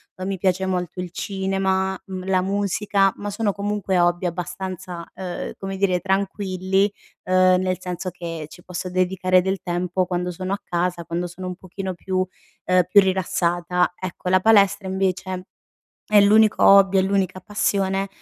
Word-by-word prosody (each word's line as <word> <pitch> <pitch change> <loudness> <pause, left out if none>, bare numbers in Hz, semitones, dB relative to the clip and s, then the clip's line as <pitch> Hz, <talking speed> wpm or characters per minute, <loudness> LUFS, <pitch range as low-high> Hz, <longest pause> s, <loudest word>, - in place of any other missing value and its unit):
ehm, 185 - -6
mi 195 -1 -2
piace 185 0 +1
molto 180 -1 -2
il 180 -1 -6
cinema, 190 0 -1
mhmm, 185 -1 -6
la 185 -1 +2
musica, 200 0 +1
ma 205 - -5
sono 205 0 0
comunque 200 -2 -1
hobby 175 +1 +2
abbastanza, 180 0 -5
uhm, 180 -2 -5
come 195 0 -5
dire, 185 -2 +2
tranquilli, 190 0 0 0.4
uhm, 185 0 +4
nel 185 -1 -1
senso 180 0 -4
che 165 -3 -6
ci 175 +3 -15
posso 180 0 -5
dedicare 185 0 +2
del 190 +1 -1
tempo 180 0 -1
quando 180 0 -2
sono 185 +3 -4
a 205 - -4
casa, 175 0 -1
quando 170 +2 -3
sono 185 +1 -8
un 180 - -4
pochino 190 0 -6
più 185 +2 -1 0.4
ehm, 185 0 +4
più 200 +2 +7
rilassata. 180 -2 0
Ecco, 185 0 -5
la 185 0 +5
palestra 200 -2 +4
invece 185 0 -2 0.6
è 210 - +6
l'unico 215 +1 +5
hobby, 195 -1 +7
è - - +4
l'unica 190 -1 0
passione, 195 -1 0
185 Hz, 160 wpm, -22 LUFS, 180-195 Hz, 0.6 s, più